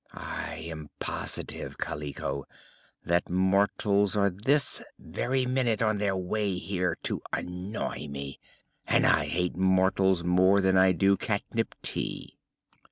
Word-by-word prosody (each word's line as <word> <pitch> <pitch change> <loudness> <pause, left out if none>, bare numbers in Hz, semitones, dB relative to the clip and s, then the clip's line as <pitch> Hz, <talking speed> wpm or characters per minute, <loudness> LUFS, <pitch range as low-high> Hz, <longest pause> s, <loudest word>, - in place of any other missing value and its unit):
I - - -5
am 80 -3 -7
positive, - - -3
Kaliko, 70 -2 -4 0.6
that 85 +1 +1
mortals 100 +2 +2
are 100 -1 +3
this 125 +9 +1 0.2
very 130 0 -1
minute 125 -3 +1
on 110 -2 +1
their 100 -2 +1
way 95 +1 -1
here 90 -1 -1
to - - -2
annoy 90 -2 -4
me 70 -1 -6 0.5
and - - +3
I - - +4
hate 90 0 -1
mortals 95 -1 +3
more 95 +3 +4
than 95 -1 +3
I 95 0 +6
do 95 +3 +3
catnip 110 +3 -2
tea!" - - -4
95 Hz, 125 wpm, -28 LUFS, 90-105 Hz, 0.6 s, I